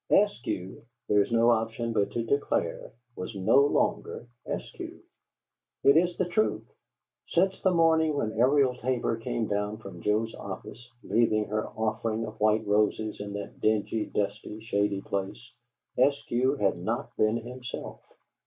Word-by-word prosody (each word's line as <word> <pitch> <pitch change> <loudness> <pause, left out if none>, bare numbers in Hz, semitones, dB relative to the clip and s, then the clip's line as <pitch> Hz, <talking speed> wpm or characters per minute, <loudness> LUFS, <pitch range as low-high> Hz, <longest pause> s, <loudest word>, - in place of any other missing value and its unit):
Eskew 120 - +1 0.3
there 105 0 +4
is 100 - -2
no 115 +1 +5
option 115 0 -1
but 100 -2 +1
to 120 - -2
declare 140 +5 -1 0.2
was 100 +4 -6
no 95 +6 +3
longer 140 -3 +1 0.2
Eskew. - - -6 0.9
It 140 - +6
is 175 +2 +3
the 185 - +1
truth; 195 +5 0 0.6
since 190 +3 +1
the 190 - +4
morning 160 -3 +3
when 110 -6 -1
Ariel 130 +3 +3
Tabor 125 -2 -1
came 115 0 -2
down 105 +1 -2
from 100 -5 -10
Joe's 110 +2 0
office, 120 +2 -8
leaving 110 -2 +2
her 110 +1 -1
offering 110 +1 -2
of 110 0 -9
white 110 +1 +3
roses 105 +1 +1
in 100 0 -6
that 100 0 -7
dingy, 110 0 +1
dusty, 105 +1 -3
shady 100 -3 0
place, 100 +6 -4 0.5
Eskew 135 0 +2
had 100 - +1
not - - -3
been 110 +2 +2
himself. 125 +1 -7
115 Hz, 145 wpm, -28 LUFS, 105-130 Hz, 0.9 s, It